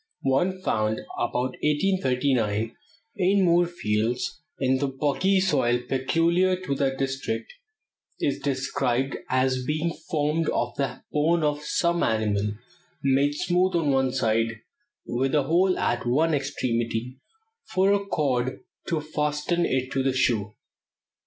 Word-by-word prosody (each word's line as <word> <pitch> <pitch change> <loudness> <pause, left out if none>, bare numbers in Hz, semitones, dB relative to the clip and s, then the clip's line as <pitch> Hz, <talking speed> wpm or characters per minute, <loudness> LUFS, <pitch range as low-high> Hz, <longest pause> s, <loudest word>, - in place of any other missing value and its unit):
One 175 +8 +1
found 110 -5 0 0.2
about 125 +2 -1
1839 130 - +1 0.4
in 190 +2 +3
Moorfields, 145 -9 0 0.2
in 130 -1 +2
the 140 - 0
boggy 150 +8 +1
soil 135 -10 +2
peculiar 170 +7 +2
to 185 -5 -3
that 135 -1 0
district, 135 - -3 0.7
is 140 - 0
described 135 -1 -1
as 130 0 +1
being 155 +4 -1 0.2
formed 155 0 +1
of 120 0 -1
the 135 -2 -3
bone 160 +3 +2
of 150 0 0
some 170 +3 0
animal, 105 -2 0 0.5
made 140 +2 +2
smooth 180 +3 +1
on 160 -4 +2
one 135 -1 +2
side, 115 -2 0 0.4
with 130 +4 0
a 145 - +3
hole 180 +6 +2
at 120 0 -1
one 155 +7 +2
extremity 125 -3 -2 0.5
for 190 +2 +2
a 200 0 +1
cord 130 -9 -1 0.3
to 160 -2 0
fasten 150 +3 -1
it 130 0 -1
to 135 - 0
the 135 0 +1
shoe. 110 -5 +1
135 Hz, 125 wpm, -25 LUFS, 125-165 Hz, 0.7 s, in